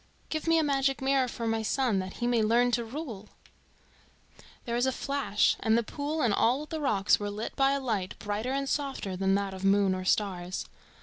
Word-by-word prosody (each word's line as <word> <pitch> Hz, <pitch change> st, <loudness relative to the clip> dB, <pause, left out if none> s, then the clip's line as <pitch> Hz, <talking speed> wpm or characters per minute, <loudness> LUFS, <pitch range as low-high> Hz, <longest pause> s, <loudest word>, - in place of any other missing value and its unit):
"Give 310 Hz, +1 st, -3 dB
me 330 Hz, 0 st, +4 dB
a 320 Hz, -, +3 dB
magic 275 Hz, -1 st, +1 dB
mirror 270 Hz, -1 st, +2 dB
for 235 Hz, -1 st, -5 dB
my 225 Hz, 0 st, 0 dB
son, 225 Hz, -2 st, +1 dB
that 185 Hz, 0 st, -5 dB
he 240 Hz, -, -4 dB
may 240 Hz, -2 st, +2 dB
learn 235 Hz, +3 st, +3 dB
to 235 Hz, 0 st, +1 dB
rule." 230 Hz, -5 st, -7 dB, 1.4 s
There 235 Hz, -, -3 dB
was 245 Hz, +2 st, +2 dB
a -, -, +2 dB
flash, 275 Hz, -6 st, +1 dB
and 220 Hz, 0 st, +2 dB
the 235 Hz, -, +1 dB
pool 295 Hz, +6 st, -3 dB
and 230 Hz, -4 st, +3 dB
all 255 Hz, +8 st, +2 dB
the 315 Hz, 0 st, -5 dB
rocks 205 Hz, -8 st, +2 dB
were 205 Hz, 0 st, -3 dB
lit 210 Hz, +2 st, -5 dB
by 275 Hz, 0 st, +3 dB
a 280 Hz, -, 0 dB
light 215 Hz, -8 st, -2 dB
brighter 210 Hz, +4 st, -3 dB
and 275 Hz, 0 st, -1 dB
softer 270 Hz, -10 st, -2 dB
than 195 Hz, +1 st, +1 dB
that 200 Hz, -1 st, -1 dB
of 190 Hz, 0 st, -8 dB
moon 195 Hz, -1 st, +3 dB
or 185 Hz, 0 st, -3 dB
stars. 185 Hz, -2 st, -1 dB
235 Hz, 210 wpm, -29 LUFS, 205-275 Hz, 1.4 s, me